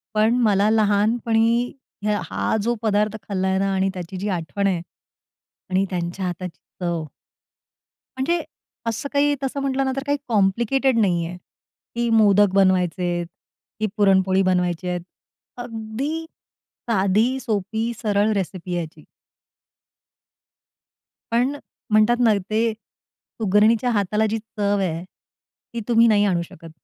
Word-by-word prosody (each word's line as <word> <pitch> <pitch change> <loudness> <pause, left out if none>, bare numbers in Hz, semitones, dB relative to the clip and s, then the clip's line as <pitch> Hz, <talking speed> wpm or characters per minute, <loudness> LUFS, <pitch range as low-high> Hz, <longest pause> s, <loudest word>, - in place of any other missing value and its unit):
पण 215 +2 +3
मला 205 -2 +3
लहानपणी 225 +2 +2 0.3
हं 210 -1 +1
हा - - -1
जो 240 +2 +1
पदार्थ 210 0 +1
खाल्लाय 190 -1 -1
ना 195 0 0
आणि 190 0 +1
त्याची 180 0 -6
जी 200 +3 -3
आठवण 170 +5 -2
आहे 180 -3 0 0.9
आणि 190 +1 +2
त्यांच्या 180 +1 -3
हाताची 180 -1 -5 0.2
चव 170 -3 -1 1.1
म्हणजे 335 +6 0 0.4
असं 230 +5 -2
काही 290 +1 +3
तसं 270 +1 -2
म्हटलं 270 0 0
ना 265 - 0
तर 270 - -3
काही 285 0 +1
कॉम्प्लिकेटेड 235 +5 +2
नाही 175 -5 +2
आहे, 175 +2 -6 0.6
की 235 0 0
मोदक 205 -3 +5
बनवायचे 185 -2 +2
आहेत 175 0 -2 0.5
ती 215 - +1
पुरणपोळी 190 -2 +4
बनवायचे 180 -1 0
आहेत. 180 0 -2 0.6
अगदी 245 +7 -4 0.6
साधी 220 +5 +2
सोपी 220 -1 -2
सरळ 210 -1 +2
रेसिपी 185 -2 -3
याची. 170 0 -6 2.3
पण 250 +5 +1 0.3
म्हणतात 215 +2 +4
ना 225 -2 +5 0.2
ते, 225 +1 +1
सुगरणीच्या 220 +1 0
हाताला 210 0 +1
जी 225 - -1
चव 205 -2 -1
आहे. 170 -3 -2 0.7
ती 235 - -3
तुम्ही 235 -1 +5
नाही 205 -2 +4
आणू 180 -4 +1
शकत. 165 -1 -11
210 Hz, 125 wpm, -22 LUFS, 185-230 Hz, 2.3 s, मोदक